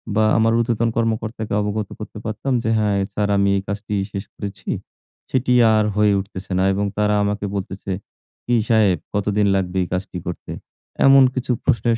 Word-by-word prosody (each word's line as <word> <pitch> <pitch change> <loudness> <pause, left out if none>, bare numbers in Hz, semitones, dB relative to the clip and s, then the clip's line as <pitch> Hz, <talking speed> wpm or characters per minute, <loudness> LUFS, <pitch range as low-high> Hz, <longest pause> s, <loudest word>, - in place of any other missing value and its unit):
বা 110 - +4
আমার 115 0 +3
ঊর্ধ্বতন 115 0 +1
কর্মকর্তাকে 110 -1 -2
অবগত 105 0 -2
করতে 110 0 -8
পারতাম 110 +5 -2
যে, 110 - 0
"হ্যাঁ 105 -2 +1 0.2
স্যার 105 -1 0
আমি 100 0 +3
এই 95 - -1
কাজটি 105 +1 -4 0.2
শেষ 100 0 -4
করেছি।" 100 -1 -7 0.6
সেটি 125 -1 +2 0.2
আর 110 -1 +3
হয়ে 105 -1 +4
উঠতেছে 95 0 -8
না - - +3
এবং 100 +1 0
তারা 105 0 +2
আমাকে 105 0 -1
বলতেছে, 95 0 -5 0.5
"কি 120 - +2
সাহেব 105 -5 +4 0.2
কতদিন 105 0 +1
লাগবে 95 -1 -1
এই - - -4
কাজটি 90 0 -3
করতে?" 85 - -6 0.5
এমন 135 0 +8
কিছু 130 -1 -2
প্রশ্নের 115 0 +2
105 Hz, 170 wpm, -21 LUFS, 100-115 Hz, 0.6 s, এমন